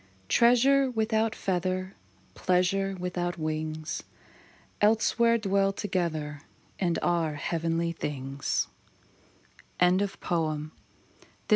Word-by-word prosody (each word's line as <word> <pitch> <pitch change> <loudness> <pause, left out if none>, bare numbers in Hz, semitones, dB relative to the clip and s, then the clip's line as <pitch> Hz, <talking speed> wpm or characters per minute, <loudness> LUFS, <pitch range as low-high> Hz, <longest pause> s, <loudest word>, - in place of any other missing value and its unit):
IV. - - -32
Treasure 260 +3 +5
without 220 -1 0
feather, 185 0 -1 0.4
Pleasure 190 +2 +1
without 175 -1 -2
wings, 155 0 -3 0.8
Elsewhere 230 +2 +4
dwell 195 -2 +2
together 165 -7 -2 0.4
And 175 -3 +1
are 165 -3 +1
heavenly 165 +2 -1
things, 140 -4 -2 1.1
LOVE 180 0 +5 0.4
UNDERSTANDS. 155 -3 0
180 Hz, 85 wpm, -28 LUFS, 155-200 Hz, 1.1 s, Treasure